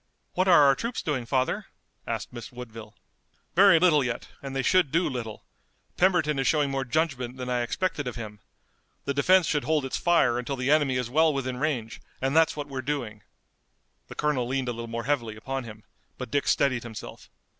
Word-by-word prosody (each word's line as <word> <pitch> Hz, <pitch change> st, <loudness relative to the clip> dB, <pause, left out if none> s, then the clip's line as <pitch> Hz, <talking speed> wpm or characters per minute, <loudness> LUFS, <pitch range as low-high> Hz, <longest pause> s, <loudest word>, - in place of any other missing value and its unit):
"What 185 Hz, +1 st, +1 dB
are 170 Hz, -5 st, +7 dB
our 140 Hz, -1 st, +6 dB
troops 235 Hz, -, -4 dB
doing, 130 Hz, -6 st, -2 dB
father?" 130 Hz, 0 st, 0 dB, 0.4 s
asked -, -, -4 dB
Miss 120 Hz, +2 st, -8 dB
Woodville. 115 Hz, -3 st, -10 dB, 0.6 s
"Very 195 Hz, -1 st, +7 dB
little 160 Hz, -5 st, +4 dB
yet, 125 Hz, -2 st, -4 dB
and 135 Hz, -1 st, -6 dB
they 135 Hz, -, 0 dB
should 180 Hz, -1 st, +3 dB
do 170 Hz, +3 st, +2 dB
little. 120 Hz, -6 st, -5 dB, 0.5 s
Pemberton 175 Hz, -6 st, +2 dB
is 135 Hz, -, +1 dB
showing 150 Hz, -3 st, +2 dB
more 135 Hz, 0 st, -1 dB
judgment 130 Hz, -3 st, -1 dB
than 125 Hz, 0 st, -4 dB
I 125 Hz, -1 st, +1 dB
expected 145 Hz, +3 st, -2 dB
of 125 Hz, -, -4 dB
him. 105 Hz, -3 st, -8 dB, 0.7 s
The 140 Hz, -, -1 dB
defense 180 Hz, +6 st, +4 dB
should 150 Hz, -2 st, 0 dB
hold 150 Hz, -2 st, +1 dB
its 135 Hz, -, -2 dB
fire 135 Hz, -9 st, +3 dB
until 130 Hz, +3 st, -3 dB
the 125 Hz, +2 st, 0 dB
enemy 145 Hz, -4 st, +3 dB
is 125 Hz, -2 st, -3 dB
well 160 Hz, +3 st, +4 dB
within 130 Hz, -3 st, -3 dB
range 125 Hz, -6 st, -2 dB, 0.2 s
and 135 Hz, +2 st, -1 dB
that's 160 Hz, 0 st, +4 dB
what 145 Hz, -1 st, -4 dB
we're 135 Hz, -2 st, -5 dB
doing!" 120 Hz, -6 st, -4 dB, 0.9 s
The -, -, -10 dB
colonel 145 Hz, -5 st, 0 dB
leaned 130 Hz, 0 st, -1 dB
a -, -, -2 dB
little 115 Hz, 0 st, -6 dB
more 115 Hz, 0 st, -4 dB
heavily 120 Hz, -5 st, -1 dB
upon 135 Hz, +4 st, -5 dB
him, 110 Hz, -1 st, -11 dB, 0.3 s
but -, -, -7 dB
Dick 145 Hz, +1 st, 0 dB
steadied 130 Hz, -4 st, +2 dB
himself. 115 Hz, -2 st, -9 dB
135 Hz, 200 wpm, -26 LUFS, 120-150 Hz, 0.9 s, are